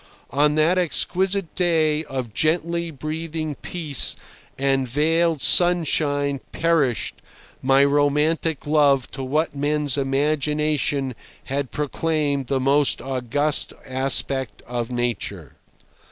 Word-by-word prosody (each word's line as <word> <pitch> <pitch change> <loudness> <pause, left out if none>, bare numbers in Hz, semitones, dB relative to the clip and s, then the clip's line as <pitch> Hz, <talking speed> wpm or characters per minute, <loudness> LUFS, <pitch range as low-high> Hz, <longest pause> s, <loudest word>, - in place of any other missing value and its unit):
On 150 +2 +2
that 165 +4 +3
exquisite 185 +1 -1
day 160 -3 +1
of 130 -6 -5
gently 170 +3 0
breathing 155 +1 -4
peace 150 -3 -1 0.4
and 135 -1 +1
veiled 160 +4 +1
sunshine 145 -5 +3
perished 155 -7 0 0.4
my 135 +1 +4
romantic 150 +2 +1
love 145 -3 +2
to 135 - -6
what 150 +3 -1
men's 145 -1 +1
imagination 145 0 0 0.3
had 135 -1 -3
proclaimed 150 -2 -1
the 135 +1 0
most 140 +2 +2
august 135 +3 0
aspect 130 -2 0
of 120 -1 -4
Nature. 120 - -3
145 Hz, 100 wpm, -22 LUFS, 135-155 Hz, 0.4 s, my